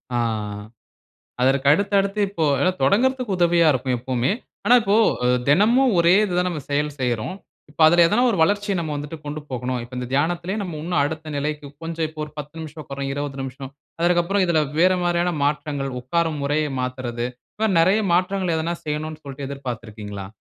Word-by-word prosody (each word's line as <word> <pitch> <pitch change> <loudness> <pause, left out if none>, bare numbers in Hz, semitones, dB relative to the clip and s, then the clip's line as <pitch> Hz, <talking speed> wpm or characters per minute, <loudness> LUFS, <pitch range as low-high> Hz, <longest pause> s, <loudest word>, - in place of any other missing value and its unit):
ஆ - - +2 1.3
அதற்கு 135 +1 +2
அடுத்து, 200 +5 +1
அடுத்து 200 +1 -3
இப்போ 170 -5 -2 0.4
தொடங்குறதுக்கு 245 - +2
உதவியா 170 -1 +4
இருக்கும் 130 -1 -1
எப்போமே. 125 +2 0 0.3
ஆனா 245 - +6
இப்போ 200 0 +2 0.5
தெனமும் 230 - +4
ஒரே 170 +1 +5
இது 190 -4 -2
தான் 180 0 +2
நம்ம 165 -4 -4
செயல் 145 +1 +1
செய்றோம். 125 - -1 0.3
இப்ப 150 - -12
அதுல 170 +2 +6
ஏதனா 210 +8 +2
ஒரு 205 - -1
வளர்ச்சிய 205 +3 +1
நம்ம 160 -2 -3
வந்துட்டு 145 +2 -6
கொண்டு 150 +1 -5
போகனும். 125 0 -2
இப்போ 120 +2 -10
இந்த 125 - -4
தியானத்திலேயே 175 +7 0
நம்ம 175 -5 -5
இன்னும் 175 -1 0
அடுத்த 155 +1 -4
நிலைக்கு 150 +1 -3 0.2
கொஞ்சம் 165 0 -2
இப்போ 155 0 -9
ஒரு 150 - -13
10 150 +1 -7
நிமிஷம் 155 0 -8
உட்கரோம் 135 0 -5
20 140 -1 -4
நிமிஷம் 135 0 -7 0.3
அதற்கு 175 0 +3
அப்புறம் 195 +2 +1
இதுல 170 -3 +3 0.2
வேற 185 +2 +5
மாரியான 175 0 +1
மாற்றங்கள் 145 -1 -1
உட்காரும் 160 +3 -1
முறைய 150 +2 +1
மாத்துறது. 125 -2 -3 0.3
இப்ப 220 +1 0
நெறைய 185 +6 +4
மாற்றங்கள் 180 0 +1
எதனா 165 +2 -1
செய்யணும் 155 +1 -4
சொல்லிட்டு 140 0 -7
எதிர்பார்த்து 125 -5 -6
இருக்கிறீங்களா? 105 -2 -7
155 Hz, 175 wpm, -22 LUFS, 135-175 Hz, 1.3 s, ஆனா